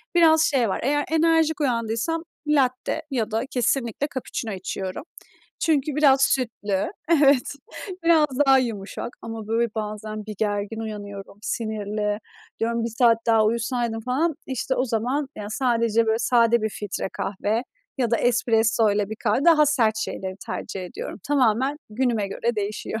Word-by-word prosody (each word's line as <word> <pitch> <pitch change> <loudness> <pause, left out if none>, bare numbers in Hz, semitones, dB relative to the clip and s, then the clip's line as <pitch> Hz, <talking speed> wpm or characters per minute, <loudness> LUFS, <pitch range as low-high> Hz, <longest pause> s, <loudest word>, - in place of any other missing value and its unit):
biraz 320 -2 +6
şey 260 -8 +2
var - - -1
eğer 290 +3 +1
enerjik 320 -1 +3
uyandıysam 235 +5 -1 0.2
latte 265 -4 +1
ya 225 -4 -1
da 225 +3 0
kesinlikle 245 +1 0
cappuccino 240 -3 -4
içiyorum. 190 +1 -5 0.6
Çünkü 300 -3 +1
biraz 275 -3 +5
sütlü 215 -8 0 0.2
evet 280 -5 +4 0.5
biraz 325 -2 +5 0.2
daha 270 0 +7
yumuşak. 225 -6 -3
Ama 225 -1 -6
böyle 230 +1 +1
bazen 215 0 -5
bir 215 - -6
gergin 205 +1 -1
uyanıyorum, 205 -2 -7
sinirli 210 -2 -2 0.4
diyorum 230 0 0
1 - - -1
saat 230 -2 +5
daha 225 -2 +4
uyusaydım 230 +1 -1
falan. 275 +8 0
İşte 260 0 -2
o 255 - +1
zaman 250 +5 -1
yani 205 0 -6
sadece 230 -2 +1
böyle 220 +1 +2
sade 235 -1 +3
bir 220 - +1
filtre 205 -2 -4
kahve 210 +4 -1 0.4
ya 245 -3 +1
da 235 - +3
espressoyla 225 -3 +2
bir 220 - -4
kahve 225 +5 0
daha 315 -3 +6
sert 235 -7 +2
şeyleri 190 -3 -4
tercih 190 - -5
ediyorum. 180 - -7
Tamamen 265 0 +2
günüme 225 -3 0
göre 235 +3 -2
değişiyor. 210 +2 -3
230 Hz, 145 wpm, -24 LUFS, 215-265 Hz, 0.6 s, daha